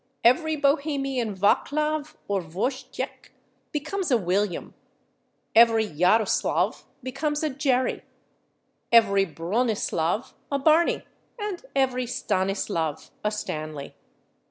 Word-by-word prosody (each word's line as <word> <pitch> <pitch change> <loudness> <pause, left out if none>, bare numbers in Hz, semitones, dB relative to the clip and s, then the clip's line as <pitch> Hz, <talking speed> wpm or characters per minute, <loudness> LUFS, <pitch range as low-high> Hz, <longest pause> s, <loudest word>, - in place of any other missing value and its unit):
Every 315 +7 +4
Bohemian 275 -6 0
/Vaclav/ 300 +9 +1
or 200 -1 0
/Vojtĕch/ 200 - -4 0.4
becomes 320 +6 -2
a 255 - +4
/William/, 195 -2 -1 0.8
every 225 -1 +6
/Jaroslav/ 185 +7 +2 0.2
becomes 295 +4 -2
a 310 - 0
/Jerry/, 260 -2 +1 0.9
every 200 -4 +5
/Bronislav/ 180 - -1 0.2
a 280 - +2
/Barney/, 315 +4 +3 0.3
and 415 -3 -4
every 255 -2 +1
/Stanislav/ 190 -8 -1
a 210 - +2
/Stanley 155 -8 -5
240 Hz, 90 wpm, -25 LUFS, 195-285 Hz, 0.9 s, every